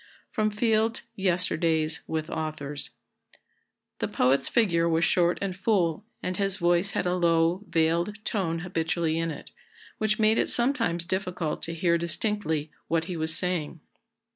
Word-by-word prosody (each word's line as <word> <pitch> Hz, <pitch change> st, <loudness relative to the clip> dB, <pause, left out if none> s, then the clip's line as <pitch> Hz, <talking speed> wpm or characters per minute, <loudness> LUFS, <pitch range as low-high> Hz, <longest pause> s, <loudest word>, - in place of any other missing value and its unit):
[Sidenote: 215 Hz, -2 st, +1 dB
Fields's 225 Hz, 0 st, +1 dB
Yesterdays 165 Hz, -4 st, +1 dB
with 160 Hz, -1 st, -2 dB
Authors.] 150 Hz, -2 st, -4 dB, 1.1 s
"The -, -, 0 dB
poet's 130 Hz, +2 st, +2 dB
figure 170 Hz, -7 st, +3 dB
was 165 Hz, 0 st, +3 dB
short 175 Hz, -1 st, +3 dB
and 190 Hz, -2 st, -2 dB
full, 190 Hz, -3 st, +1 dB, 0.2 s
and 185 Hz, 0 st, -2 dB
his 195 Hz, -1 st, 0 dB
voice 175 Hz, +2 st, +2 dB
had -, -, 0 dB
a 180 Hz, -, +1 dB
low, 170 Hz, +1 st, +2 dB
veiled 170 Hz, +5 st, +1 dB
tone 165 Hz, -6 st, -1 dB
habitually 165 Hz, -2 st, -1 dB
in 165 Hz, 0 st, 0 dB
it, 155 Hz, -, -8 dB, 0.5 s
which 215 Hz, -1 st, +1 dB
made 220 Hz, +1 st, +4 dB
it -, -, +1 dB
sometimes 235 Hz, -10 st, +1 dB
difficult 180 Hz, -4 st, -2 dB
to 165 Hz, -, -3 dB
hear 170 Hz, 0 st, +2 dB
distinctly 170 Hz, -3 st, -1 dB, 0.2 s
what 165 Hz, -1 st, +1 dB
he 180 Hz, 0 st, -4 dB
was 160 Hz, -1 st, -1 dB
saying. 170 Hz, -3 st, -2 dB
170 Hz, 145 wpm, -27 LUFS, 160-195 Hz, 1.1 s, made